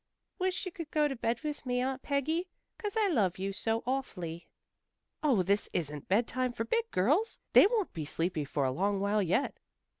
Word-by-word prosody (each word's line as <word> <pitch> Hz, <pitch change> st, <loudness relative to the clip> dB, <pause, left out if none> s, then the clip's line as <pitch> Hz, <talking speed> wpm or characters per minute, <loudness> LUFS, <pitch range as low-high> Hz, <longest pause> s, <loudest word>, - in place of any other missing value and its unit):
"Wish 370 Hz, 0 st, 0 dB
you'd 340 Hz, -4 st, -6 dB
go 300 Hz, -1 st, +3 dB
to 275 Hz, -, -3 dB
bed 235 Hz, -1 st, -1 dB
with 300 Hz, -1 st, -4 dB
me, 250 Hz, -1 st, 0 dB
Aunt 260 Hz, +1 st, -1 dB
Peggy. 315 Hz, +6 st, 0 dB, 0.3 s
'Cause 420 Hz, 0 st, -3 dB
I 430 Hz, -2 st, +4 dB
love 205 Hz, -, +2 dB
you 195 Hz, +1 st, -2 dB
so 225 Hz, +3 st, -1 dB
awfully." 180 Hz, -11 st, -3 dB, 0.7 s
"Oh, 255 Hz, -11 st, +3 dB
this 200 Hz, +3 st, +1 dB
isn't 150 Hz, -4 st, -3 dB
bedtime 240 Hz, +5 st, +1 dB
for 225 Hz, -1 st, -2 dB
big 460 Hz, -, 0 dB
girls. 295 Hz, -, +2 dB, 0.2 s
They -, -, +9 dB
won't 430 Hz, -3 st, -1 dB
be 155 Hz, -2 st, -4 dB
sleepy 165 Hz, +1 st, -1 dB
for 140 Hz, 0 st, -1 dB
a 130 Hz, -, +1 dB
long 195 Hz, +7 st, 0 dB
while 205 Hz, +2 st, +2 dB
yet." 190 Hz, +9 st, 0 dB
240 Hz, 185 wpm, -31 LUFS, 185-300 Hz, 0.7 s, They